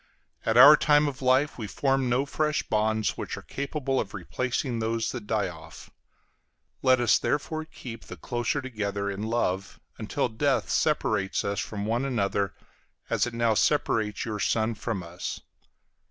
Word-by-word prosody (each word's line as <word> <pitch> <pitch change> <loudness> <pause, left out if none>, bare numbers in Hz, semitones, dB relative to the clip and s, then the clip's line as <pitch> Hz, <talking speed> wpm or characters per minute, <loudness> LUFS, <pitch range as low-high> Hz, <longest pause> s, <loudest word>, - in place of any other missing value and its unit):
At 115 +1 +3
our 145 +5 +11
time 150 0 +4
of 135 -2 -5
life 130 +2 +2
we 110 - -4
form 135 +3 0
no 125 +3 +2
fresh 150 +1 0
bonds 110 0 0
which - - -4
are - - -9
capable 140 -1 -2
of 105 0 -4
replacing 125 - -2
those 115 0 -1
that 120 -5 -7
die 105 -3 +1
off. 80 -2 -11 0.9
Let 130 -1 +4
us 120 -3 +4
therefore 155 +2 -2
keep 120 -7 -10
the 90 - -9
closer 120 - -2
together 100 -5 -3
in 100 +1 -5
love 105 -4 -1 0.2
until - - -1
death 135 +4 0
separates 110 -10 +1
us 100 0 -1
from 105 -2 -4
one 115 +4 0
another, 100 -7 -1 0.6
as - - +2
it 120 - -6
now 115 -1 +2
separates 110 -4 +1
your 110 -2 -4
son 110 +2 +1
from 110 -3 -4
us. 85 +2 -6
115 Hz, 160 wpm, -27 LUFS, 105-135 Hz, 0.9 s, our